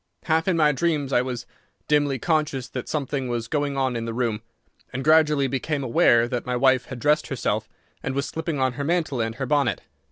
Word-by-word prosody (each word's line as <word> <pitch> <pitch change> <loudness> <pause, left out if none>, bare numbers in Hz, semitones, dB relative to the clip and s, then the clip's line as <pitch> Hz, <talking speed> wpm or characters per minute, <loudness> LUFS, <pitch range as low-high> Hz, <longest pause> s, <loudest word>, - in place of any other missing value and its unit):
Half 160 +1 +1
in 185 -3 +2
my 150 -2 +5
dreams 150 -3 -1
I 125 - +4
was 125 -2 -4 0.4
dimly 145 -2 +2
conscious 150 -4 0
that 125 -2 -6
something 140 -3 -2
was 120 -1 -3
going 145 0 -1
on 130 -2 0
in 115 -1 -3
the 115 -1 -4
room, 115 -3 -1 0.5
and 130 +1 -4
gradually 150 -2 +4
became 140 +2 -2
aware 120 -1 +4
that 120 0 -3
my 125 0 -2
wife 130 0 +3
had 130 - -7
dressed 150 +4 +2
herself 110 -4 -2 0.3
and 135 - -3
was 140 0 0
slipping 160 -1 -3
on 130 -1 +1
her 140 +3 -4
mantle 155 -5 0
and 115 0 -2
her 135 - -3
bonnet. 140 - +1
135 Hz, 210 wpm, -24 LUFS, 125-150 Hz, 0.5 s, my